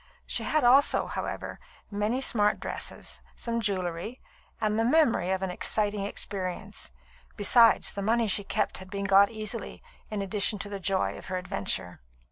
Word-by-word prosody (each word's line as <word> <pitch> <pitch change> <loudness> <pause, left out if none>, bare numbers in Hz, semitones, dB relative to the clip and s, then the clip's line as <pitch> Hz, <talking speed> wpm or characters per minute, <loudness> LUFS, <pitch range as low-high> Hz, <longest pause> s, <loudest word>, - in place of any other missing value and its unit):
She - - -1
had 310 - +1
also, 265 +4 +5
however, - - -5 0.3
many 210 +5 -1
smart 210 -5 +2
dresses, - - -5
some 235 -1 -3
jewellery, 190 +2 -2 0.4
and 215 0 0
the - - +3
memory 240 - +3
of 190 0 0
an 190 - -1
exciting 205 +1 0
experience. 195 0 -5 0.5
Besides, 230 +3 +5
the 200 - -5
money 225 +3 +2
she 205 0 +2
kept 205 +1 -1
had 185 0 -11
been 200 +1 -4
got 195 +1 +6
easily, 220 -1 -5 0.3
in 210 -2 -3
addition 205 +2 0
to 205 +1 -5
the 200 -1 -5
joy 190 0 0
of - - -11
her 185 - -2
adventure. 95 - -3
205 Hz, 160 wpm, -28 LUFS, 190-225 Hz, 0.5 s, got